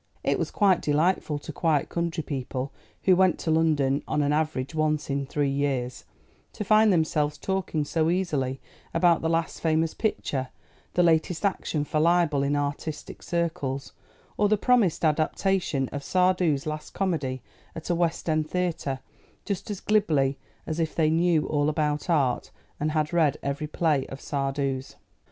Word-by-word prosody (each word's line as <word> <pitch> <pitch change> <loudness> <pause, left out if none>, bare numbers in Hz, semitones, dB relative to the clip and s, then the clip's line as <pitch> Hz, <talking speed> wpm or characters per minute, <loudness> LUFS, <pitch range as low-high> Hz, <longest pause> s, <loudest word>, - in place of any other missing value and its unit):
It - - +1
was - - -1
quite 195 -4 +3
delightful 155 0 +1
to 150 +2 -8
quiet 155 -2 +1
country 170 -2 -2
people, 135 -1 -4 0.3
who 185 - +5
went 185 0 +3
to 160 - 0
London 150 -4 +2
on 150 - +1
an 145 +1 +1
average 155 -3 -1
once 155 -2 0
in 140 0 -1
three 145 0 0
years, 135 -3 -2 0.5
to - - -4
find 215 +1 +5
themselves 150 -3 +1
talking 185 -4 -2
so 160 +2 +1
easily 150 -8 -1 0.4
about 170 0 +4
the 160 - 0
last 165 0 -1
famous 160 0 +1
picture, 140 - -2 0.5
the 180 - +4
latest 165 +1 +2
action 165 -6 0
for 155 - -1
libel 165 -3 +3
in 140 +1 +1
artistic 145 +2 -4
circles, 145 -6 -2 0.4
or 205 -1 +3
the 215 - +3
promised 205 -8 +2
adaptation 155 -1 +1
of 145 - -5
Sardou's 180 -4 +2
last 155 0 -5
comedy 150 -9 -1 0.3
at 165 +2 -4
a - - +3
West 170 -1 -1
End 155 -1 +1
theatre, 165 -7 -2 0.4
just 200 0 -3
as 205 -3 -4
glibly 155 -12 +2 0.3
as 160 +1 -3
if 160 -1 -1
they 155 -2 +3
knew 165 -1 +3
all 145 -1 +1
about 150 +1 -1
art, 140 -7 +1 0.3
and 150 +1 -1
had 155 +1 0
read 160 -5 +3
every 140 +2 -2
play 150 -3 +1
of 135 - -8
Sardou's. 135 -1 -2
155 Hz, 160 wpm, -26 LUFS, 145-170 Hz, 0.5 s, who